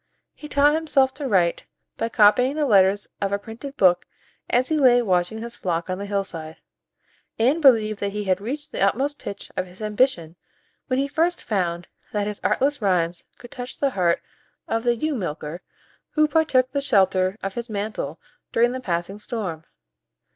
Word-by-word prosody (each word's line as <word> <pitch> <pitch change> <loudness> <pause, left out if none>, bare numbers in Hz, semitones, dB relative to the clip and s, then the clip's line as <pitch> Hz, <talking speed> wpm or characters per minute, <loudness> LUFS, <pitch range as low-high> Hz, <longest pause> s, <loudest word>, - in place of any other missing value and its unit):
He 300 - -10
taught 290 0 +4
himself 295 -4 +2
to 280 0 -4
write, 180 -7 +1 0.3
by 230 - -2
copying 240 +5 +4
the 305 -1 +1
letters 200 -3 +4 0.2
of 200 -1 0
a 200 - +1
printed 235 +7 -9
book 180 -2 +4 0.4
as 250 +1 +2
he 315 -1 +1
lay 250 -3 +6
watching 180 0 0
his 235 0 -7
flock 170 -4 -2
on 185 - -3
the 200 - -5
hillside, 175 -6 -4 0.8
and 265 +9 +2
believed 220 -7 +4
that 200 0 -2
he 210 +1 -3
had 190 -1 0
reached 290 +7 -5
the - - -4
utmost 270 +9 +1
pitch 200 - -7
of 185 - -2
his 180 +1 -16
ambition 210 -6 0 0.5
when 255 - 0
he 275 +1 +1
first 330 +4 0
found 175 -5 -2 0.3
that 205 -1 0
his 210 -1 -5
artless 285 0 +1
rhymes 175 -4 0
could 240 - -13
touch 250 0 -7
the 280 -1 +1
heart 175 -6 +1 0.4
of 225 - 0
the 240 -1 +2
ewe 305 +6 -1
milker 170 - -4 0.5
who 305 -1 +4
partook 295 -5 +2
the 280 - -1
shelter 190 -6 +2
of 195 0 -3
his 235 +2 -5
mantle 210 +1 -4 0.3
during 240 +1 +3
the 255 +1 -5
passing 180 0 -3
storm. 185 -8 -5
215 Hz, 180 wpm, -23 LUFS, 185-265 Hz, 0.8 s, lay